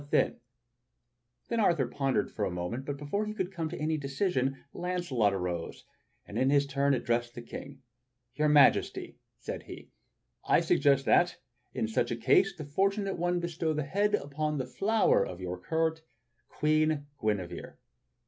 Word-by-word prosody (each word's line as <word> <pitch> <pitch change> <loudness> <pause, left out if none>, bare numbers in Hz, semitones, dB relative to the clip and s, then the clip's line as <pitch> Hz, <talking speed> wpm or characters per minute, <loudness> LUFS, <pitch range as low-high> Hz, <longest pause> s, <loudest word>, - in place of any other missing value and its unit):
Then - - +3 1.3
Arthur 170 - +3
pondered 135 +1 -1
for 105 - -3
a - - +1
moment, 90 +9 -4
but 145 0 -4
before 175 +10 -2
he 215 - -5
could 185 -3 -2
come 165 -4 -3
to 175 - -6
any 155 +1 0
decision, 135 -2 -1
Launcelot 175 - 0
arose 90 -3 -4 0.4
and - - -4
in 130 - +3
his 140 0 +4
turn 140 0 +1
addressed 120 -1 -1
the 120 - -6
King: 135 +3 -9 0.5
"Your 150 +3 +1
Majesty," 145 -2 +3 0.2
said - - -6
he, - - -11 0.5
"I - - +4
suggest 140 -1 +3
that, 175 0 +4 0.4
in 110 - 0
such 110 - 0
a 120 - -1
case, 175 +11 +3
the 155 -3 -7
fortunate 195 +5 0
one 175 +1 +1
bestow 170 -2 -1
the 150 0 -1
head 205 +8 +1
upon 150 -2 -2
the 130 - -2
flower 210 - +2
of 90 - -6
your 90 -1 -5
court 160 - 0 0.3
— 120 -1 -46
Queen 155 -1 +2 0.2
Guinevere." 100 -5 -2
145 Hz, 160 wpm, -30 LUFS, 130-170 Hz, 1.3 s, his